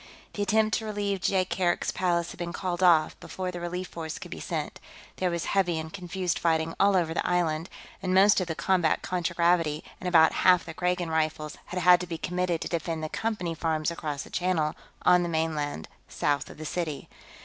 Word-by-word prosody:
The 205 - -4
attempt 215 +2 +2
to 220 - -7
relieve 205 -2 -2
Jaikark's 185 -1 +1
palace 170 -2 0
had - - -12
been 170 0 -4
called 180 -1 -3
off 170 -4 +5
before 185 -1 -5
the 175 - -6
relief 180 +1 -4
force 160 -2 -6
could - - -10
be - - -6
sent; - - -4 0.4
there 185 - +1
was 170 -1 -2
heavy 180 -4 +1
and 160 0 -5
confused 180 -2 -2
fighting 160 -1 +1
all 200 0 +4
over 165 -3 +1
the - - -1
island, 165 -2 0 0.3
and 185 -1 -2
most 195 +1 +5
of 180 - -2
the 160 - -3
combat 175 -4 +1
contragravity 170 -3 +1 0.2
and 185 - -5
about 165 -3 +6
half 180 -1 +5
the 160 - -7
Kragan 180 -1 -1
Rifles 155 -1 -1
had 180 +1 -4
had 180 0 +7
to 180 - -5
be 165 -1 -4
committed 180 0 -1
to - - -3
defend 165 -1 -3
the 155 - -3
Company 210 -6 -2
farms 160 0 -1
across 150 -4 -4
the - - -14
Channel, 175 -4 0 0.3
on 180 0 +6
the 175 - -1
mainland, 155 - -2 0.2
south 145 -1 -1
of - - -12
the 155 - -7
city. 155 -3 -3
175 Hz, 205 wpm, -27 LUFS, 160-185 Hz, 0.4 s, had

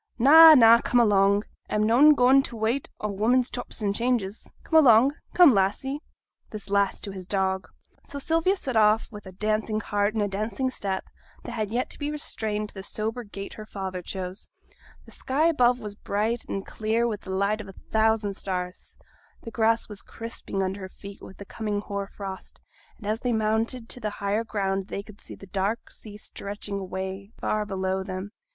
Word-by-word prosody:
'Na, 315 +6 +9
na, 230 -2 +7
come 245 - +2
along! 200 -2 +4 0.3
a'm 210 - +1
noane 265 +8 +6
goin' 260 +1 +5
for - - -6
t' - - -9
wait 225 +5 -1
o' 210 - -1
women's 235 +5 +1
chops 245 - -4
and 200 -1 +1
changes. 230 -3 -1
Come 320 - +4
along; 245 +2 +6 0.2
come, 350 -7 +8
Lassie!' 205 +9 0 0.5
(this 210 -2 -8
last 200 -1 +1
to 200 - -4
his 185 -2 -8
dog). 190 -1 0 0.4
So 285 - -7
Sylvia 330 +6 +1
set 270 -10 -5
off 215 0 +4
with 210 -3 -10
a - - -8
dancing 215 +2 -1
heart 205 0 -1
and 215 - +1
a - - 0
dancing 215 +6 -2
step, 195 -5 -3 0.4
that - - -7
had 215 -2 -3 0.2
to - - -8
be 290 0 -2
restrained 215 -8 -3
to - - -12
the 195 - -7
sober 220 +4 -4
gait 200 -2 -8
her 215 - -9
father 190 -3 -5
chose. 185 +1 -6 0.6
The - - -15
sky 280 +5 0
above 250 -7 +3
was 210 -3 -6
bright 215 +3 -2
and 195 - -3
clear 225 +2 0
with 210 -3 -4
the - - -11
light 200 +3 0
of 205 - -11
a 195 - -10 0.2
thousand 220 -2 +2
stars, 180 -2 -5 0.5
the 230 - -7
grass 225 0 +1
was 205 -2 -8
crisping 225 -4 -5
under 190 +1 -3
their 190 - -7
feet 200 +1 -12
with 190 - -12
the 200 - -9
coming 210 0 -3
hoar 200 -1 -4
frost; 195 -1 -8 0.4
and 215 - -13
as 215 +2 -1
they 245 -1 -1
mounted 225 +2 -1
to - - -3
the 215 - -2
higher 200 +3 -1
ground 195 -3 -2
they 200 - -5
could 210 -1 -15
see - - -10
the - - -13
dark 195 +4 -2
sea 210 -2 -10
stretching 200 -1 -6
away 190 +2 -6
far 210 -1 -1
below 190 -1 -2
them. 190 +1 -6
210 Hz, 195 wpm, -26 LUFS, 195-235 Hz, 0.6 s, Na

